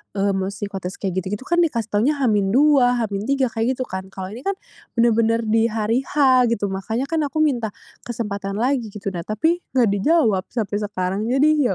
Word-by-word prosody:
mmm, 195 -1 0
psikotes 195 -2 -5
kayak 190 -2 -1
gitu-gitu 200 +6 -5
kan 345 +4 +1
dikasih 235 -10 +1
taunya 240 +9 +2
H-2, 260 +4 +3 0.2
H-3 235 +4 -1
kayak 235 +3 0
gitu, 255 - -2
kan. 190 -4 -6
Kalau 190 0 -7
ini 230 - -8
kan 395 0 0 0.4
benar-benar 230 0 +3
di 225 +1 +2
hari 225 +2 0
H 260 -4 +4
gitu. 205 -4 -1
Makanya 220 +8 -3
kan 325 - +1
aku 310 +2 0
minta 235 -8 0 0.3
kesempatan 200 -4 -4
lagi, 245 0 0
gitu. 200 -1 -5
Nah, 170 -2 -5
tapi, 320 - +1 0.2
nggak 240 -4 +4
dijawab 210 - +2
sampai 210 -3 -2
sekarang. 200 0 -2
Jadi, 280 -1 +3
225 Hz, 175 wpm, -21 LUFS, 200-260 Hz, 0.4 s, H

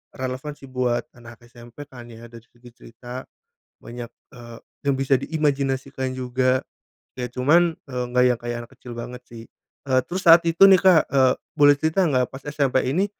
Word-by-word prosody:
relevan 130 +3 -5
sih - - -13
buat 125 -2 -1
anak 120 0 -15
SMP 120 +3 -13
kan 125 -4 -13
ya, 115 0 -13
dari 115 -1 -12
segi 120 0 -18
cerita, 125 +2 -11 0.6
banyak, 120 0 -8 0.3
eee, 120 -2 -12 0.3
yang 140 - +2
bisa 135 -1 +1
diimajinasikan 135 -3 -2
juga. 130 0 0 0.5
Ya 125 -1 -4
cuman, 160 +7 +2
eee, 125 -3 -4
nggak 125 0 +3
yang 125 -2 +1
kayak 120 0 -4
anak - - -42
kecil 125 - -11
banget 125 +1 -8
sih. 115 -1 -11 0.4
Eee, 130 -1 +3
terus 185 +1 -5
saat 170 0 +8
itu 170 +4 +6
nih, 190 -2 +6
Kak, 185 -5 +6
eee, 130 -1 +3 0.2
boleh 145 -1 +5
cerita 160 +6 +1
nggak, 130 -2 +1
pas 135 +1 -10
SMP 140 -3 0
ini, 185 +8 +1
130 Hz, 175 wpm, -22 LUFS, 120-145 Hz, 0.6 s, saat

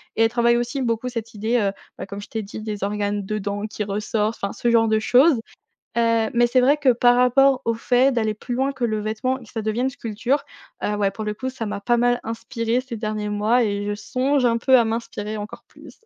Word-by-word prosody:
et 225 - +3
elle 225 - +4
travaille 235 0 +3
aussi 240 +3 -2
beaucoup 230 0 -1
cette 230 -2 -6
idée, 220 +3 0
heu, 200 -3 +1 0.3
bah, - - -6
comme 200 +1 -7
je - - -11
t'ai 220 -1 -3
dit, 210 +2 -8
des 210 -2 -5
organes 205 0 -2
dedans 205 0 -3
qui 210 - -4
ressortent, 210 +2 -1
enfin, 200 - -2
ce 240 - -1
genre 225 -1 +4
de 220 0 +2
choses, 260 +7 +5 0.6
heu. 230 -1 +2
Mais 240 0 +4
c'est 255 +2 +3
vrai 270 +4 +4
que 285 -3 +3
par 245 0 +4
rapport 255 +2 +4
au 230 - +1
fait 250 +3 +2
d'aller 220 -3 0
plus 245 +3 -5
loin 265 +3 0
que 260 -3 -3
le 215 -2 0
vêtement 220 +5 -2
et 255 - -14
que 215 - -16
ça 225 -2 -4
devienne 225 +4 0
une - - 0
sculpture, 250 +2 -2 0.4
heu, 210 - 0
ouais, 200 -1 +1
pour 215 +2 -6
le 210 - -2
coup, 260 +5 -4
ça 255 -3 -5
m'a 205 -1 -4
pas 240 +3 +2
mal 245 0 +2
inspirée 230 +1 -2
ces 255 -3 -7
derniers 215 -1 -3
mois 215 +4 +2
et 205 -1 -2
je 205 - -1
songe 260 +5 0
un 230 -1 +2
peu 260 +2 +5
à 235 - +4
m'inspirer 220 -2 -4
encore 210 +1 -8
plus. - - -16
230 Hz, 245 wpm, -22 LUFS, 210-245 Hz, 0.6 s, choses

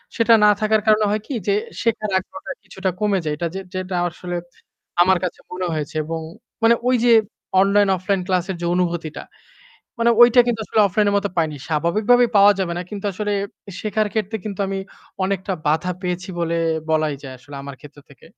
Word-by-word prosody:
সেটা 230 0 +4
না 210 - +7
থাকার 215 0 +2
কারণে 215 0 +4
হয় 210 0 0
কি 275 - -3
যে 200 - +3 0.3
শেখার 215 -3 -1
আগ্রহটা 190 0 -9
কিছুটা 190 0 -3
কমে 205 -2 +2
যায়। 150 -1 -1
এটা 170 - -1 0.3
যেটা 185 0 -3
আসলে 175 +1 -6 0.7
আমার 190 0 +3
কাছে 180 - -5
মনে 180 0 -3
হয়েছে 155 -1 -4
এবং 165 +1 -3 0.4
মানে 230 +1 +6
ওই 255 - +4
যে 240 - +6 0.5
অনলাইন-অফলাইন 195 -1 +2
ক্লাসের 185 0 0
যে 170 - -2
অনুভূতিটা। 170 -3 -2 0.8
মানে 235 0 +4
ঐটা 240 +1 +7
কিন্তু 230 -2 -1
আসলে 220 - +2
অফলাইন 205 +2 +1
এর - - -1
মতো 200 0 -2
পাইনি। 155 -3 0
স্বাভাবিকভাবে 205 +11 +3
পাওয়া 200 +1 +7
যাবে 175 -3 -1
না - - -3
কিন্তু 205 -1 -7
আসলে 210 +2 -2 0.5
শেখার 215 0 0
ক্ষেত্রে 220 0 -1
কিন্তু 205 -2 -5
আমি 195 - -2 0.5
অনেকটা 190 0 -2
বাধা 160 +4 +1
পেয়েছি 180 0 -3
বলে, 170 0 0 0.3
বলাই 155 -2 +1
যায়; 130 -2 -8
আসলে 140 +3 -11
আমার 140 -1 -8
ক্ষেত্র 150 -1 -14
থেকে। 140 - -17
190 Hz, 180 wpm, -21 LUFS, 170-210 Hz, 0.8 s, না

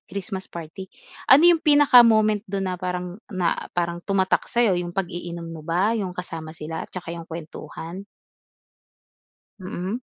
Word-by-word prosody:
Christmas 190 0 -5
party, 170 +3 -8 0.4
ano 285 +5 +8
'yong 345 -2 +6
pinaka-moment 240 -8 +6
do'n 195 0 -2
na - - -2
parang 180 +2 -4
na 185 -5 0 0.2
parang 170 0 -1
tumatak 190 0 0
sa'yo? 235 -5 +3
'Yong 175 +1 -6
pag-iinom 175 -2 -4
mo 165 -1 -8
ba 175 +7 +1
'yong 190 -6 -3
kasama 165 -3 -7
sila 160 +1 -6
'tsaka 170 -2 -7
'yong 170 -1 -8
kuwentuhan? 165 +2 -8 1.6
Mm. 185 +5 -4
180 Hz, 135 wpm, -24 LUFS, 170-210 Hz, 1.6 s, ano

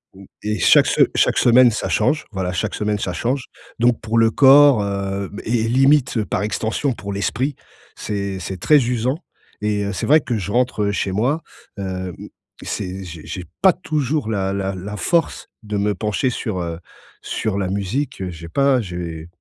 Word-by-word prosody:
Mmh 95 +1 -13 0.2
et 105 -1 -2
chaque - - +6
se - - +2
chaque - - +2
semaine, 120 0 +6
ça 110 - -3
change, 155 -1 +1
voilà 95 -2 -3
chaque 85 - -2
semaine, 105 0 -1
ça 95 - -2
change, 125 +6 -2 0.3
donc 120 0 +3
pour 110 +1 -1
le 115 0 +4
corps, 140 -1 +7
heu, 100 0 -3
b 100 - -8
et 115 0 0
et 110 - 0
limite 130 -1 +3
par - - -2
extension 110 +6 -1
pour 100 -3 -7
l'esprit. 125 +8 -1 0.4
C'est 100 -2 -3
c'est 95 +2 -5
très 150 - +5
usant 125 +3 0 0.4
et 105 -1 0
heu, 100 - -3
c'est - - -3
vrai 155 +2 +5
que 120 -4 -2
je 100 0 -4
rentre, 125 -3 +1
heu, 100 - +1
chez 95 - -1
moi, 125 +11 0 0.4
hem, 95 -2 -4 0.5
c'est 95 +1 -4
j'ai 85 -3 -9
j'ai 90 - -6 0.2
pas 190 -1 +6
toujours 155 -7 -2
la 95 -3 -1
la 100 0 -2
la 100 +3 -6
force 165 - 0 0.2
de 105 -1 -5
me 105 +1 +1
pencher 105 +6 -1
sur, 110 -6 -3
heu, 85 -1 -4 0.4
sur 110 -3 -2
la 100 -2 -1
musique, 100 +7 -2
heu, 95 - -3
j'ai 85 -1 -9
pas 135 +8 +2
j'ai 85 -4 -6
105 Hz, 190 wpm, -20 LUFS, 95-125 Hz, 0.5 s, corps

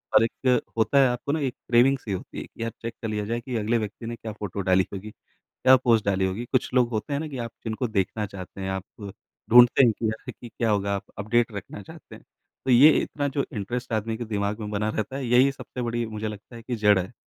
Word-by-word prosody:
और - - +7
एक 125 +1 +1 0.2
होता 115 +5 +2
है 135 - +6
आपको 125 +3 -2
ना 160 - 0
एक 135 -4 -1 0.2
क्रेविंग-सी 125 -1 +3
होती 95 - -5
है - - -5
कि - - -8
यार, 115 - -2
चेक 115 0 -4
कर 115 - -3
लिया 105 -1 -2
जाए 115 +3 -2
कि 125 0 -5
अगले 110 +2 +1
व्यक्ति 110 +1 -5
ने 120 +1 -4
क्या 115 -1 -7
फोटो 100 -1 -4
डाली 95 0 +3
होगी, 100 +2 -6 0.4
क्या 130 0 +4
पोस्ट 120 -4 +2
डाली 95 -1 +1
होगी। 95 +6 -3
कुछ 130 -2 +1
लोग 125 -2 +4
होते 110 +5 -3
हैं 140 - 0
ना 160 - -4
कि 135 -3 -7
आप 115 -1 -4
जिनको 110 +2 -2
देखना 105 0 -1
चाहते 95 0 -9
हैं, 95 - -3
आप 95 0 -3 0.7
ढूँढते 120 +2 +8
हैं 115 - +4
कि 115 - -1
अरे, 110 - -7
कि 120 - -12
क्या 115 0 -1
होगा, 100 -1 +1
आप 100 - -4
अपडेट 115 +3 +1
रखना 100 0 -7
चाहते 160 - -13
हैं। - - -14 0.4
तो 130 - 0
ये 130 +5 +8
इतना 145 -1 -2
जो 140 0 -1
इंटरेस्ट 120 +4 -4
आदमी 110 +1 -1
के 120 - -5
दिमाग 105 0 -2
में 105 - -5
बना 105 +1 -1
रहता 110 +4 -3
है, 135 -2 -3
यही 125 +3 +5
सबसे 130 -2 -7
बड़ी 120 0 -1
मुझे 110 0 -4
लगता 105 +3 -10
है 115 - -10
कि 120 0 -3
जड़ 105 -2 +4
है। 95 +6 -4
115 Hz, 255 wpm, -25 LUFS, 105-125 Hz, 0.7 s, ढूँढते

